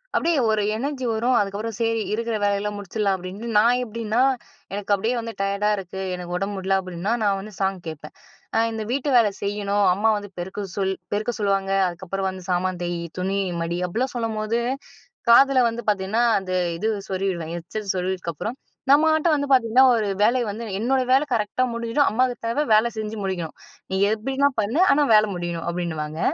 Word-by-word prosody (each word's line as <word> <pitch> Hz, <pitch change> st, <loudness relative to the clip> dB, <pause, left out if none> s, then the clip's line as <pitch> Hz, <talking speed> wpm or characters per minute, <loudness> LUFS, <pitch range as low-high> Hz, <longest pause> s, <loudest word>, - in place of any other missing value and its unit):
அப்பிடியே 330 Hz, -3 st, +2 dB
ஒரு 215 Hz, -1 st, +2 dB
எனர்ஜி 265 Hz, +2 st, -3 dB
வரும், 235 Hz, +3 st, +1 dB
அதுக்கப்புறம் 205 Hz, +2 st, -2 dB
சரி 225 Hz, -1 st, +1 dB
இருக்கிற 230 Hz, +1 st, -1 dB
வேலையிலாம் 205 Hz, +1 st, 0 dB
முடிச்சிர்லாம் 200 Hz, 0 st, -1 dB
அப்பிடின்ட்டு 190 Hz, +5 st, -7 dB
நான் 235 Hz, +3 st, +4 dB
எப்பிடின்னா, 225 Hz, 0 st, -1 dB, 0.5 s
எனக்கு 205 Hz, 0 st, -4 dB
அப்பிடியே 220 Hz, +5 st, +1 dB
வந்து 230 Hz, 0 st, -6 dB
டயர்டா 200 Hz, +1 st, +1 dB
இருக்கு, 190 Hz, 0 st, -6 dB
எனக்கு 175 Hz, 0 st, -5 dB
உடம்பு 200 Hz, +2 st, -3 dB
முடியல 190 Hz, 0 st, +1 dB
அப்பிடின்னா, 185 Hz, +2 st, -4 dB
நான் 200 Hz, -1 st, +2 dB
வந்து 210 Hz, +2 st, -9 dB
சாங் 195 Hz, -1 st, 0 dB
கேட்பேன். 155 Hz, -1 st, -8 dB, 0.4 s
அ -, -, +5 dB
இந்த 220 Hz, -1 st, -4 dB
வீட்டு 275 Hz, +3 st, -1 dB
வேல 225 Hz, -3 st, +5 dB
செய்யணும், 205 Hz, 0 st, 0 dB
அம்மா 210 Hz, +4 st, +2 dB
வந்து 205 Hz, 0 st, -7 dB
பெருக்க 190 Hz, +4 st, -5 dB, 0.2 s
சொல் 190 Hz, -1 st, 0 dB, 0.2 s
பெருக்க 215 Hz, +4 st, 0 dB
சொல்லுவாங்க. 195 Hz, -1 st, 0 dB, 0.2 s
அதுக்கப்புறம் 185 Hz, +2 st, -3 dB
வந்து 185 Hz, -1 st, -8 dB
சாமான் 180 Hz, 0 st, 0 dB
தேய், 175 Hz, -1 st, -2 dB, 0.2 s
துணி 195 Hz, +2 st, 0 dB, 0.2 s
மடி 170 Hz, +1 st, -2 dB
அப்பிடிலாம் 240 Hz, +9 st, -2 dB
சொல்லும்போது, 225 Hz, -1 st, -1 dB, 0.7 s
காதில 270 Hz, +3 st, +7 dB
வந்து 230 Hz, +1 st, -5 dB
பார்த்தீங்கன்னா, 205 Hz, +3 st, +1 dB, 0.2 s
அந்த 190 Hz, -1 st, -7 dB, 0.3 s
இது 215 Hz, +6 st, 0 dB, 0.2 s
சொருவிடுவேன். 185 Hz, -4 st, -2 dB
ஹெட்செட் 195 Hz, +4 st, -4 dB
சொருவினதுக்கப்பறம் 185 Hz, -, -3 dB, 0.3 s
நம்மட்ட 315 Hz, +2 st, +4 dB
வந்து 285 Hz, -1 st, -1 dB
பார்த்தீங்கன்னா 255 Hz, 0 st, +5 dB
ஒரு 220 Hz, -2 st, 0 dB, 0.2 s
வேலை 240 Hz, +4 st, +3 dB
வந்து, 215 Hz, +3 st, -5 dB, 0.2 s
என்னோட 260 Hz, +4 st, +2 dB
வேலை 275 Hz, +3 st, +4 dB
கரெக்ட்டா 215 Hz, +3 st, 0 dB
முடிஞ்சுடும். 235 Hz, +5 st, +1 dB
அம்மாவுக்கு 250 Hz, +1 st, 0 dB
தேவை 235 Hz, +6 st, +1 dB
வேல 215 Hz, +2 st, +5 dB
செஞ்சு 215 Hz, 0 st, -4 dB
முடிக்கணும். 180 Hz, -4 st, -3 dB, 0.4 s
நீ 190 Hz, -, 0 dB
எப்பிடினா 270 Hz, +6 st, +1 dB
பண்ணு. 220 Hz, +9 st, -1 dB
ஆனா 290 Hz, +1 st, +4 dB
வேலை 215 Hz, 0 st, +5 dB
முடியணும் 175 Hz, -1 st, -4 dB
அப்பிடின்னுவாங்க. 160 Hz, -3 st, -3 dB
210 Hz, 170 wpm, -23 LUFS, 190-230 Hz, 0.7 s, காதில